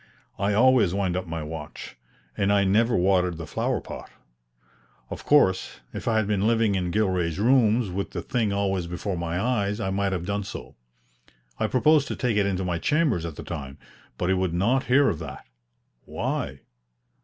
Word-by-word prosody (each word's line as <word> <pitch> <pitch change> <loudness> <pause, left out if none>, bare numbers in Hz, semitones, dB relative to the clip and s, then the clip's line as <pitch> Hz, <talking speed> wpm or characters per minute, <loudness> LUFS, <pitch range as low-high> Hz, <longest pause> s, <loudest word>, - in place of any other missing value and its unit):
I 100 +2 +1
always 120 -6 +4
wind 95 -3 0
up 95 -1 -3
my 80 -1 -4
watch, 75 -1 -8 0.4
and 100 +1 +1
I 100 -1 +4
never 115 +5 +3
watered 90 -2 +2
the 80 - -6
flower - - -1
pot. - - -9 1.0
Of - - -6
course, 95 -11 +3
if - - -6
I 115 -1 +2
had 110 - +2
been 105 0 +1
living 115 -2 +2
in 90 -2 -1
Gilray's 90 -4 0
rooms 115 -2 +3
with 100 +2 -3
the - - -5
thing 115 -5 0
always 95 -3 -1
before 90 +3 -3
my 85 0 -2
eyes 105 -2 0
I 95 -3 -2
might 100 0 0
have 90 -2 -3
done 100 +1 -2
so. 95 - -8 0.8
I 110 - +1
proposed 140 +6 +3
to - - -3
take 125 -4 0
it 100 -1 +2
into 95 -1 -1
my 85 -2 -1
chambers 140 - +1
at 80 - -7
the - - -8
time, 70 -5 -6 0.4
but 90 - -1
he - - +4
would 95 -2 0
not 120 +9 +1
hear 135 +3 +4
of 80 - 0
that. - - -8 0.6
Why? 70 -1 -3
100 Hz, 190 wpm, -25 LUFS, 90-110 Hz, 1.0 s, always